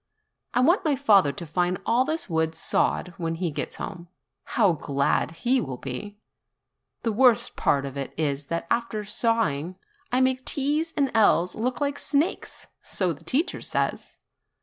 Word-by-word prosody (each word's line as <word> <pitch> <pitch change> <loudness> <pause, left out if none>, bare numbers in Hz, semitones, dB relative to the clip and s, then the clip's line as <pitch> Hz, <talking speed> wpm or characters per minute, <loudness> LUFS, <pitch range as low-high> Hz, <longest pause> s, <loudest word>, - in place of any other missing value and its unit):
I 250 - +4
want 340 +9 +4
my 305 -4 +2
father 205 - +4
to 170 - -7
find 180 +3 0
all 245 +3 +3
this 315 +2 +1
wood 160 -2 0
sawed 180 - +1
when 165 -2 -2
he 170 -1 -2
gets 145 0 -4
home; 175 -3 -7 0.5
how 205 -6 +5
glad 140 -3 0 0.2
he 255 +2 +4
will 130 -4 -5
be! 140 +12 -6 0.9
The 230 - +1
worst 240 +1 +3
part 140 -1 +1
of 135 -1 -6
it 135 - -4
is 145 -2 -1
that 170 +2 -2
after 230 -3 -1
sawing 200 - 0 0.4
I 250 - +2
make 260 0 +2
T's 295 +5 0
and 275 -2 +2
L's 180 -5 +4
which - - -6
look 250 +3 -1
like 285 0 -1
snakes, 295 +4 -1 0.2
so 180 -3 -1
the - - -15
teacher 325 +8 0
says. - - -2
205 Hz, 170 wpm, -25 LUFS, 160-260 Hz, 0.9 s, how